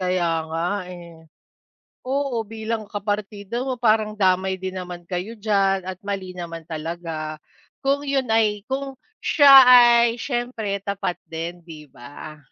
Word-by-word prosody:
Kaya 180 -2 0 0.2
nga, 165 +2 -1 0.2
eh. 170 -2 -11 0.9
Oo, 265 -4 -1
bilang 220 0 -4
kapartido 205 +3 -4
mo, 255 - -1
parang 215 -2 +2
damay 190 -2 +1
din 190 0 -4
naman 180 -1 -7
kayo 185 +5 -4
diyan 195 -3 +1
at 185 0 -6
mali 195 -2 -4
naman 165 -1 -6
talaga. 155 -1 -5 0.4
Kung 280 +1 0
yun 270 -4 -1
ay, 215 -2 +2
kung 270 0 -3 0.3
siya 285 -3 +6
ay, 240 -1 +7
siyempre 240 -6 -3
tapat 200 -3 -2
din, 170 +1 -7
'di 155 -3 -12
ba? 145 +5 -11
200 Hz, 135 wpm, -22 LUFS, 175-230 Hz, 0.9 s, ay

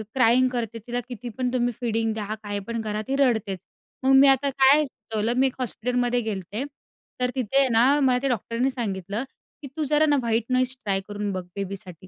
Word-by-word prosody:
Crying 255 0 +4
करते. 230 -1 -3
तिला 245 0 -1
कितीपण 245 +1 -4
तुम्ही 245 -1 +1
फीडिंग 225 -1 0
द्या. 215 -1 -4
काहीपण 205 +3 -4
करा. 215 -1 -3
ती 270 - 0
रडतेच. 220 -8 +1 0.4
मग 265 +1 +4
मी 275 +1 +7
आता 270 +1 +4
काय 275 +2 +5
सुचवलं. 225 -3 -3
मी 265 +1 +4
एक 260 - -5
हॉस्पिटलमध्ये 245 0 0
गेले 215 -4 -3
होते. 200 +7 -5 0.6
तर 250 - +2
तिथे 260 +1 +1
आहे 275 - +5
ना 250 +5 +4
मला 260 -3 +3
ते - - +2
डॉक्टरांनी 235 +2 -1
सांगितलं, 205 -2 -3 0.4
की 285 - -7
तू 310 - 0
जरा 300 +2 +3
ना 295 -1 +3
व्हाईट 230 -1 0
नॉईज 255 0 +1
ट्राय 195 -3 0
करून 205 0 -3
बघ 185 -1 -4
बेबीसाठी. 190 -3 -7
240 Hz, 195 wpm, -24 LUFS, 215-260 Hz, 0.6 s, मी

